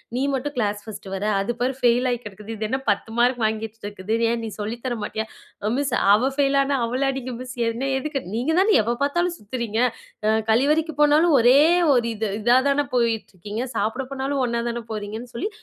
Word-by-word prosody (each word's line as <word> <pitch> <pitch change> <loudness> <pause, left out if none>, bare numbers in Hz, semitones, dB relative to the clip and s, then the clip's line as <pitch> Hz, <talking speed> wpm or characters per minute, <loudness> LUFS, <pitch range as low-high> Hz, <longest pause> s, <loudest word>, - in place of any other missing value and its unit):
"நீ 255 - 0
மட்டும் 285 +2 -2
class 205 -2 0
first 215 -3 -9
வர்ற. 195 +2 -3
அது 195 +4 -1
பாரு 255 +2 +1
ஃபெயில் 245 0 +3
ஆகி 240 -1 -1
கெடக்குது. 210 +1 -9
இது 215 0 -3
என்ன 265 - 0
10 205 +2 0
மார்க் 245 +1 +2
வாங்கி 220 0 -1
வைச்சிட்டிருக்குது. 205 -2 -6 0.2
ஏன் 235 0 -1
நீ 220 - -3
சொல்லித் 230 +4 -4
தர 245 -2 -1
மாட்டீயா?" 220 +1 -3 0.4
அ 215 - +1
"மிஸ், 280 -3 -1 0.2
அவ 240 +6 +3
ஃபெயில் 280 -1 +2
ஆனா 275 0 0
அவள 250 +3 -2
அடிங்க 260 -2 -4
மிஸ், 250 -1 -7
என்ன 250 +4 -2
எதுக்கு?" 275 0 -3
நீங்க 255 +7 0
தானே 415 +3 +4
எப்ப 235 +3 -1
பாத்தாலும் 345 +5 0
சுத்துறீங்க. 225 0 -3 0.5
அ - - +4 0.2
கழிவறைக்கு 300 +6 +2
போனாலும் 300 +2 +5
ஒரே 245 +4 +6 0.3
ஒரு 240 -2 +2
இது 220 0 -2
இதாதான 265 +5 +3
போயிட்ருக்கீங்க. 220 -2 -1
சாப்பட 225 +5 -1
போனாலும் 270 0 -1
ஒண்ணா 235 -1 -1
தான 235 0 -4
போறீங்கன்னு 220 +3 -6
சொல்லி, 410 - -2
240 Hz, 190 wpm, -23 LUFS, 220-270 Hz, 0.5 s, ஒரே